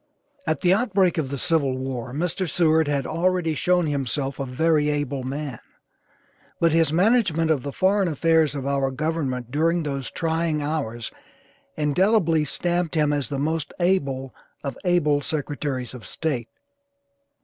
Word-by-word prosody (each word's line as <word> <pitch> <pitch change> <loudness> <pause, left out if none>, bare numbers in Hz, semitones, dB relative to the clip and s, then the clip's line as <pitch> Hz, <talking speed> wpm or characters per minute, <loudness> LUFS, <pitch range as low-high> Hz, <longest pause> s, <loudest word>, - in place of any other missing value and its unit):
At 155 -3 0
the 180 0 +4
outbreak 195 -5 +2
of 140 -4 -2
the 140 - -3
civil 145 -4 +1
war 130 -2 -4
Mr. 175 +5 -2
Seward 160 -2 +3
had 140 -2 0
already 175 0 0
shown 180 +3 +2
himself 140 -1 -2
a 135 - -2
very 150 +3 +2
able 145 -2 -1
man, 135 -1 -4 1.0
but 165 -1 +4
his 165 -1 +3
management 175 -3 +3
of 145 -4 +1
the 140 - -5
foreign 195 +4 +2
affairs 160 -1 +2
of 135 -2 -4
our 140 -1 +1
government 135 -4 -2
during 165 +4 +1
those 140 -4 -3
trying 165 -1 -1
hours 140 -7 -3 0.7
indelibly 165 +1 +2
stamped 175 +3 -1
him 150 -2 +2
as 145 -2 -1
the 140 - -2
most 155 +2 -2
able 140 -8 0 0.3
of 140 - -4
able 150 -5 +3
Secretaries 145 -4 -3
of 125 -3 -10
State. 130 -8 -3
150 Hz, 150 wpm, -24 LUFS, 140-165 Hz, 1.0 s, the